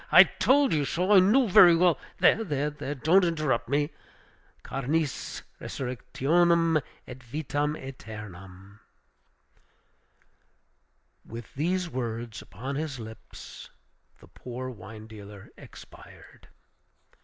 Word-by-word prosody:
I -, -, +10 dB
told 275 Hz, -2 st, +2 dB
you 150 Hz, -2 st, +1 dB
so. 180 Hz, +7 st, -1 dB
I 200 Hz, -, +8 dB
knew 225 Hz, +7 st, +4 dB
very 180 Hz, -3 st, +8 dB
well, 175 Hz, -1 st, +3 dB, 0.2 s
there, 225 Hz, -, +4 dB
there, 145 Hz, -3 st, -3 dB
don't 165 Hz, +8 st, +4 dB
interrupt 155 Hz, -9 st, 0 dB
me 145 Hz, +2 st, 0 dB, 0.7 s
Carnis 140 Hz, +2 st, -2 dB, 0.2 s
resurrectionem 165 Hz, +6 st, +1 dB, 0.3 s
et 125 Hz, 0 st, -10 dB
vitam 145 Hz, +3 st, -2 dB
eternam!" 100 Hz, -, -10 dB, 2.4 s
With 115 Hz, +1 st, -10 dB
these 180 Hz, +5 st, -1 dB
words 120 Hz, -4 st, -5 dB
upon 130 Hz, +8 st, -6 dB
his 150 Hz, -4 st, -4 dB
lips, 110 Hz, -1 st, -11 dB, 0.5 s
the -, -, -17 dB
poor 130 Hz, +1 st, -7 dB
wine 110 Hz, -1 st, -11 dB
dealer 105 Hz, -2 st, -12 dB
expired. -, -, -15 dB
140 Hz, 100 wpm, -27 LUFS, 115-165 Hz, 2.4 s, I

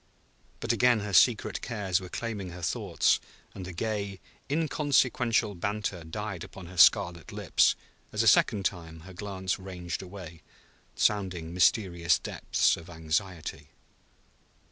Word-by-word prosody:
But -, -, +1 dB
again 125 Hz, -3 st, +3 dB
her 105 Hz, -1 st, -5 dB
secret 110 Hz, +5 st, +4 dB
cares 100 Hz, -6 st, -1 dB
were 90 Hz, -, -8 dB
claiming 105 Hz, -5 st, -4 dB
her 90 Hz, 0 st, -9 dB
thoughts, -, -, +1 dB, 0.3 s
and 95 Hz, -, -7 dB
the 90 Hz, -, -6 dB
gay, 100 Hz, +1 st, -3 dB, 0.3 s
inconsequential 130 Hz, -7 st, +1 dB
banter 100 Hz, -1 st, -3 dB
died 95 Hz, +2 st, -5 dB
upon 95 Hz, -, -10 dB
her 90 Hz, +1 st, -11 dB
scarlet 85 Hz, 0 st, +4 dB
lips -, -, +2 dB, 0.4 s
as -, -, 0 dB
a -, -, +1 dB
second 100 Hz, -2 st, +4 dB
time 80 Hz, -3 st, -3 dB
her 95 Hz, +3 st, -12 dB
glance 95 Hz, 0 st, -3 dB
ranged 90 Hz, -2 st, -5 dB
away, 90 Hz, -4 st, -10 dB, 0.5 s
sounding 90 Hz, -6 st, 0 dB
mysterious 90 Hz, -2 st, +3 dB
depths -, -, +1 dB
of 85 Hz, +1 st, -12 dB
anxiety. 80 Hz, -2 st, -3 dB
95 Hz, 130 wpm, -28 LUFS, 85-105 Hz, 0.5 s, secret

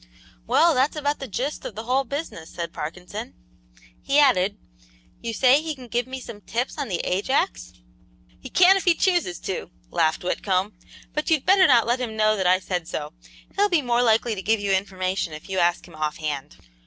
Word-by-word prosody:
"Well, 335 Hz, 0 st, +4 dB
that's 270 Hz, +3 st, +1 dB
about 290 Hz, -1 st, -1 dB
the 270 Hz, -, -6 dB
'gist' 255 Hz, +7 st, -3 dB
of 215 Hz, -, -7 dB
the 220 Hz, -, -5 dB
whole 260 Hz, +3 st, +1 dB
business," 275 Hz, -, -6 dB
said 170 Hz, -1 st, -6 dB
Parkinson; 175 Hz, -, -7 dB, 0.7 s
he 280 Hz, -, +1 dB
added: 205 Hz, -9 st, +4 dB, 0.6 s
"You 230 Hz, -, -3 dB
say 255 Hz, +5 st, +4 dB
he 315 Hz, -1 st, -4 dB
can 255 Hz, -2 st, -12 dB
give 240 Hz, +1 st, -1 dB
me 260 Hz, 0 st, -6 dB
some 235 Hz, -4 st, -10 dB
'tips' 235 Hz, -, -3 dB
on 285 Hz, -, -2 dB
the 180 Hz, -5 st, -2 dB
Ajax?" 180 Hz, -, -1 dB, 0.7 s
"He -, -, -9 dB
can 370 Hz, +2 st, +6 dB
if 390 Hz, -, -4 dB
he 350 Hz, -2 st, +5 dB
chooses 350 Hz, -, +1 dB
to," 185 Hz, -3 st, -4 dB, 0.2 s
laughed 165 Hz, -1 st, +1 dB
Whitcomb, 190 Hz, +2 st, -1 dB, 0.4 s
"but 300 Hz, +3 st, -2 dB
you'd 315 Hz, -4 st, +2 dB
better 380 Hz, 0 st, +6 dB
not 240 Hz, -4 st, +5 dB
let 240 Hz, +2 st, +1 dB
him 220 Hz, -3 st, -4 dB
know 215 Hz, 0 st, +3 dB
that 190 Hz, -3 st, 0 dB
I 185 Hz, +1 st, +5 dB
said 180 Hz, -3 st, -3 dB
so. 150 Hz, -1 st, -5 dB, 0.4 s
He'll 410 Hz, +1 st, +3 dB
be 340 Hz, -6 st, +2 dB
more 240 Hz, -1 st, +2 dB
likely 230 Hz, 0 st, +3 dB
to 195 Hz, -, -5 dB
give 220 Hz, +3 st, +1 dB
you 200 Hz, -1 st, -1 dB
information 190 Hz, -2 st, -1 dB
if 155 Hz, -, -9 dB
you 190 Hz, -1 st, -1 dB
ask 175 Hz, 0 st, +1 dB
him -, -, -16 dB
offhand." 150 Hz, -, -4 dB
220 Hz, 200 wpm, -24 LUFS, 180-275 Hz, 0.7 s, can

